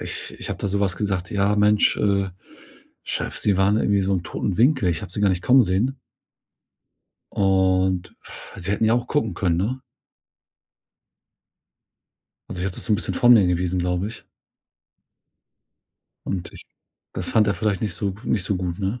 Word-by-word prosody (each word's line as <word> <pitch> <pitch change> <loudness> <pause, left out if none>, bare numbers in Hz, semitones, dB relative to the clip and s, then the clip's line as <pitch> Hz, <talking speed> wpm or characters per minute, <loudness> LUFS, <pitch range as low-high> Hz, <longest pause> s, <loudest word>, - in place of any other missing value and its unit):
ich - - -4
ich - - -6
habe - - -4
da 100 - -2
so 100 +1 -1
was 95 -3 0
gesagt: 95 -2 -2
„Ja, 100 0 +1
Mensch, 105 0 +3
äh, 100 -2 +1 0.7
Chef, - - -3
sie 100 -3 +1
waren 95 +2 +3
irgendwie 100 -2 +2
so 95 0 0
'n 90 - -1
toten 95 +1 -3
Winkel. 125 -4 +3
Ich 85 +4 -1
habe 95 -3 -8
sie - - -4
gar 100 - +4
nicht 90 -2 -1
kommen 130 +4 +6
sehen“ 105 +8 0 1.4
„und 95 -1 +1 0.4
sie 90 - -4
hätten 105 - 0
ja 110 - +3
auch 120 0 -1
gucken 115 -9 -1
können, 85 -2 0
ne?“ 125 +8 -2 2.7
Also 90 - -6
ich - - -2
habe 95 - -4
das - - -5
so 115 - 0
'n - - +4
bisschen 110 - -3
von 120 0 +5
mir 105 -6 +6
gewiesen, 90 +1 0
glaube 90 +2 -1
ich 115 - -11 2.0
und 90 -3 -3
ich - - -12 0.5
das - - -4
fand 110 -1 +3
er 100 - +1
vielleicht 105 -2 -1
nicht 105 -5 -2
so 100 0 -2
nicht 105 - 0
so 100 -1 0
gut, 90 -1 -4
ne? 100 +5 -2
100 Hz, 180 wpm, -23 LUFS, 95-105 Hz, 2.7 s, kommen